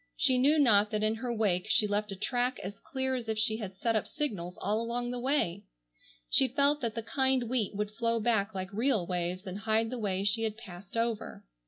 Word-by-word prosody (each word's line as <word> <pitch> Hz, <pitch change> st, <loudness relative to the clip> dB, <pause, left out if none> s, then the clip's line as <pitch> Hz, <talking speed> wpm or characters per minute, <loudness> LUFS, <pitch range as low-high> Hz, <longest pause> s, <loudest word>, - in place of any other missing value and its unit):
She 255 Hz, -1 st, +4 dB
knew 290 Hz, +5 st, +4 dB
not 215 Hz, -7 st, +5 dB
that 215 Hz, -1 st, -1 dB
in 215 Hz, 0 st, +2 dB
her 240 Hz, +2 st, -4 dB
wake 205 Hz, -6 st, 0 dB
she 215 Hz, -, +4 dB
left 210 Hz, 0 st, -1 dB
a -, -, -4 dB
track 245 Hz, +5 st, -1 dB
as 195 Hz, +2 st, -7 dB
clear 265 Hz, -1 st, -2 dB
as 240 Hz, -3 st, -3 dB
if 220 Hz, -, -1 dB
she 220 Hz, 0 st, +2 dB
had 195 Hz, -4 st, -7 dB
set 230 Hz, +2 st, 0 dB
up 215 Hz, -, 0 dB
signals 180 Hz, -, -4 dB
all 210 Hz, +3 st, -1 dB
along 240 Hz, +1 st, -2 dB
the 250 Hz, -, -3 dB
way. 240 Hz, -8 st, 0 dB, 0.6 s
She 265 Hz, -, +4 dB
felt 280 Hz, +3 st, +2 dB
that 230 Hz, -3 st, -2 dB
the 230 Hz, -, -3 dB
kind 265 Hz, +1 st, +2 dB
wheat 225 Hz, -5 st, -1 dB
would 210 Hz, 0 st, -2 dB
flow 230 Hz, +1 st, 0 dB
back 220 Hz, -2 st, +1 dB
like 190 Hz, +1 st, -5 dB
real 225 Hz, -3 st, +1 dB
waves 180 Hz, +1 st, -2 dB
and 190 Hz, +1 st, -5 dB
hide 220 Hz, +1 st, +1 dB
the 250 Hz, -, -4 dB
way 195 Hz, -3 st, -1 dB
she 205 Hz, +3 st, +2 dB
had 220 Hz, -1 st, -2 dB
passed 195 Hz, -2 st, -9 dB
over. 230 Hz, -2 st, -2 dB
220 Hz, 225 wpm, -30 LUFS, 200-245 Hz, 0.6 s, not